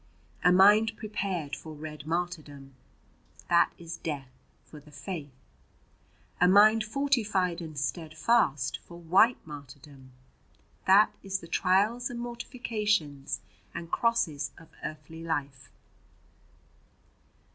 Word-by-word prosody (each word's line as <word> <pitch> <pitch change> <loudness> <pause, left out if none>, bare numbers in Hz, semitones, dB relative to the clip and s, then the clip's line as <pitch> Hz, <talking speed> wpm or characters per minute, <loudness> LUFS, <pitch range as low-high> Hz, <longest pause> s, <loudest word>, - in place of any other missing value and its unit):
"A 180 - +6
mind 205 +4 +6
prepared 190 -8 -3
for 160 - -9
red 150 0 -8
martyrdom 155 -5 -4 0.8
that 170 0 +5
is 170 -1 -7
death 140 -5 -5 0.3
for 150 - -12
the 150 +1 -18
faith. 145 +1 -6 1.1
"A 180 - +7
mind 215 +4 +6
fortified 215 -8 0
and 155 -3 -8
steadfast 155 - 0
for 170 - -13
white 190 +9 +4
martyrdom 140 -2 -12 0.8
that 200 +3 +6
is 195 -1 -2
the 170 - -11
trials 205 +9 +2
and 240 -2 -6
mortifications 215 - -2 0.3
and 165 -1 -6
crosses 230 -12 +1
of 165 -2 -15
earthly 155 +1 -7
life. 140 -6 -3
170 Hz, 105 wpm, -29 LUFS, 150-210 Hz, 1.1 s, A